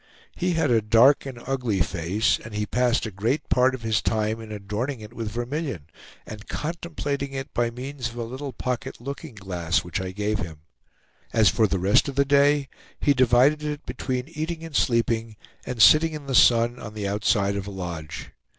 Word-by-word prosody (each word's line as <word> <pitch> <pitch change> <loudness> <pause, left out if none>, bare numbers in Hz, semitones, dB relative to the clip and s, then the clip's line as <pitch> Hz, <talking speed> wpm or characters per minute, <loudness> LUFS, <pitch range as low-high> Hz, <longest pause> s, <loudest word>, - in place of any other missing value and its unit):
He 180 0 0
had 160 -5 +1
a 115 -2 +4
dark 115 +7 +5
and 130 -3 -7
ugly 125 -7 -1
face, 95 +7 0
and 110 -1 -9
he 105 0 -1
passed 125 +2 +1
a 110 - -5
great 110 +10 -1
part 130 +1 +3
of 125 - -11
his 110 -1 +1
time 110 0 -1
in 110 -1 -9
adorning 105 +6 -4
it 105 +1 -11
with 115 -2 -4
vermilion, 120 - -4 0.4
and 105 -1 -10
contemplating 150 -4 -4
it 135 0 -6
by 120 -1 +1
means 125 +1 -5
of 115 - -13
a 120 - -3
little 130 +4 -6
pocket 125 +2 -4
looking 140 +1 -7
glass 90 -4 -1
which 90 +1 -3
I 95 - -4
gave 105 +3 -2
him. 80 -2 -6 0.7
As 110 -3 +5
for 110 -2 +3
the 95 - -1
rest 95 +9 +3
of 135 - -6
the 140 +1 +3
day, 140 0 +3 0.3
he 145 - +3
divided 130 +4 +4
it 150 0 -4
between 125 0 -3
eating 165 +1 -4
and 165 -2 -8
sleeping, 115 -3 +1 0.3
and 125 -2 -4
sitting 155 +8 +7
in 150 -2 -7
the 135 - -4
sun 120 0 +5
on 110 -1 -8
the 105 -2 -3
outside 100 0 +1
of 100 0 -4
a - - -4
lodge. 85 -5 -6
120 Hz, 195 wpm, -25 LUFS, 105-140 Hz, 0.7 s, sitting